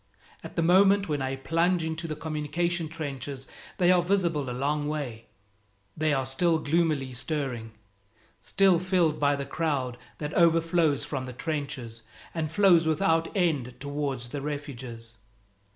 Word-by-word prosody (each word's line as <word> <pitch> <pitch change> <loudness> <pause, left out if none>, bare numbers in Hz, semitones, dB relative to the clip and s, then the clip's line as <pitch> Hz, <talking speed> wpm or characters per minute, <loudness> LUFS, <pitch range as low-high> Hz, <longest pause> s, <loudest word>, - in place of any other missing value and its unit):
At - - -9
the 170 - +1
moment 195 +3 +5
when 145 -3 -1
I 135 0 -1
plunge 165 +5 +1
into 160 +1 -3
the 155 - -3
communication 160 +2 -2
trenches 140 -4 -6 0.3
they 180 0 +4
are 180 -1 +5
visible 170 -7 0
a - - -3
long 145 +4 -1
way; 130 -7 -4 0.7
they 155 0 +1
are 135 -2 +1
still 160 +6 +2
gloomily 155 -4 0
stirring, 125 -5 -3 0.7
still 190 -3 +3
filled 175 -4 +1
by 145 -1 +3
the 140 0 -4
crowd 135 -5 -2 0.2
that 150 0 -4
overflows 165 -3 +3
from 130 -3 -4
the 125 - -7
trenches 140 -6 -4 0.3
and 155 -2 -2
flows 175 -3 +5
without 165 0 +2
end 145 -9 0
towards 140 -3 -3
the 140 +3 -4
refuges. 125 -6 -6
150 Hz, 145 wpm, -27 LUFS, 135-165 Hz, 0.7 s, moment